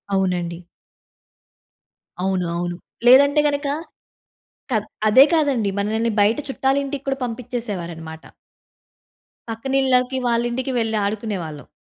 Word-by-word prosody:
అవునండి. 175 -3 -1 1.6
అవును. 190 -2 0
అవును. 175 0 -3 0.3
లేదంటే 280 +4 +7
గనక 285 0 -1 1.0
కాద్ 215 -3 +1 0.2
అదే 260 +6 +8
కాదండి, 275 -10 +1
మనల్ని 220 +3 0
బయట 210 +5 +3
చుట్టాల 270 +1 +1
ఇంటికి 275 0 -5
కూడా 270 0 0
పంపించేసేవారన్నమాట. 200 -10 -5 1.3
పక్కనిళ్ళకి, 260 +2 +1
వాళ్ళింటికి 240 +2 0
వెళ్ళి 225 -1 0
ఆడుకునేవాళ్ళం. 195 - -4
230 Hz, 90 wpm, -21 LUFS, 190-265 Hz, 1.6 s, అదే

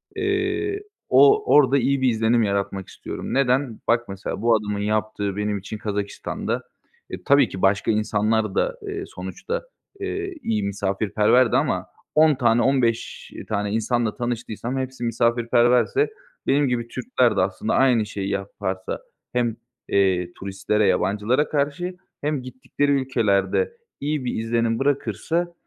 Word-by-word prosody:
eee, 400 +1 -1 0.3
o 420 +1 +6
orada 140 -2 +5
iyi 135 +1 +1
bir 130 - +4
izlenim 115 +1 +2
yaratmak 100 -2 -2
istiyorum. - - -6
Neden? 130 -2 +1
Bak, 120 -2 +2
mesela, 95 +1 -5
bu 115 0 +4
adamın 105 -1 -2
yaptığı 105 -1 -1
benim 105 0 -1
için 100 +3 -7
Kazakistan’da, 105 -1 -3 0.5
e, - - -7
tabii 140 0 +4
ki 95 - -7
başka 100 +2 +3
insanlar 110 -1 +1
da, - - 0
eee, - - -4
sonuçta, 95 - -5 0.4
eee, 395 -1 -3
iyi 105 -2 0
misafirperverdi 105 +5 +2
ama 95 - 0 0.3
10 155 -1 +6
tane, 120 -2 +3
15 120 -3 0 0.2
tane 100 -1 -1
insanla 115 0 0
tanıştıysam 120 +1 -3
hepsi 130 -1 -4
misafirperverse 120 - +2 0.4
benim 145 0 +3
gibi 120 -2 -1
Türkler 125 0 +1
de - - +4
aslında 95 +3 -1
aynı 125 -5 +4
şeyi 100 -2 -4
yaparsa 95 -1 -3 0.3
hem, 120 -2 +1 0.3
eee, 90 -3 +2
turistlere, 100 +2 -1
yabancılara 105 +10 +1
karşı 155 +5 -1 0.2
hem 150 -2 -1
gittikleri 130 +3 -2
ülkelerde 115 - +1 0.3
iyi 145 -2 -2
bir 125 - -2
izlenim 115 0 0
bırakırsa, 145 - -1
115 Hz, 135 wpm, -23 LUFS, 105-135 Hz, 0.5 s, o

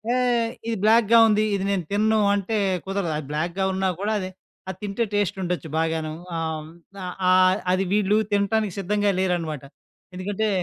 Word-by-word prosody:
ఏహ్! 240 -2 +1 0.2
ఇది 230 - 0
బ్లాక్‌గా 230 +1 +5
ఉంది. 215 0 +3
ఇది 195 - -2
నేనుతినను 205 +4 +1 0.2
అంటే 205 +2 -1 0.3
కుదరదు. 195 -4 -2
అది 150 -3 -6
బ్లాక్‌గా 170 +5 -1
ఉన్నా 190 0 0
కూడా 210 +2 -1
అది, 185 -1 -4 0.4
అది 190 - -6
తింటే 205 +3 -1
టేస్టుండొచ్చు 180 -5 -1
బాగాను. 160 -1 -1 0.3
ఆహ్, 160 -1 -2
హ్మ్, 155 - -12 0.3
ఆహ్, - - -4 0.2
ఆహ్, 185 +1 +5
అది 185 +1 +1
వీళ్ళు 210 0 +3 0.2
తినటానికి 205 0 +1
సిద్ధంగా 205 +1 +1
లేరనమాట. 170 -6 -1 0.5
ఎందుకంటే, 205 +3 -2
195 Hz, 155 wpm, -24 LUFS, 175-210 Hz, 0.5 s, బ్లాక్‌గా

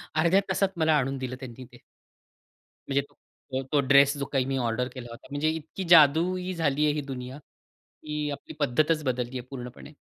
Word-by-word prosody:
अर्ध्या 170 +5 +4
तासात 190 +1 +1
मला 160 -1 +3
आणून 135 0 -1
दिलं 130 -1 -4
त्यांनी 130 -1 -9
ते. - - -18 1.1
म्हणजे 140 0 +1
तो 145 - -28 0.4
तो 130 - 0 0.2
जो 135 - -6
ड्रेस 140 +1 +5
जो 140 - -3
काही 135 -2 +2
मी 135 0 -1
ऑर्डर 120 0 -1
केला 125 -2 -8
होता, 115 - -12
म्हणजे 145 +2 0
इतकी 160 +4 -5
जादूई 175 +4 +5
झाली 150 -3 +1
आहे 150 - +2
ही 150 - -2
दुनिया, 130 -1 -6 0.7
ही 150 -1 -3
आपली 140 - -8
पद्धतच 155 +3 +1
बदलली 125 -1 -2
आहे 125 - -9
पूर्णपणे. 125 +2 -9
140 Hz, 185 wpm, -27 LUFS, 130-155 Hz, 1.1 s, ड्रेस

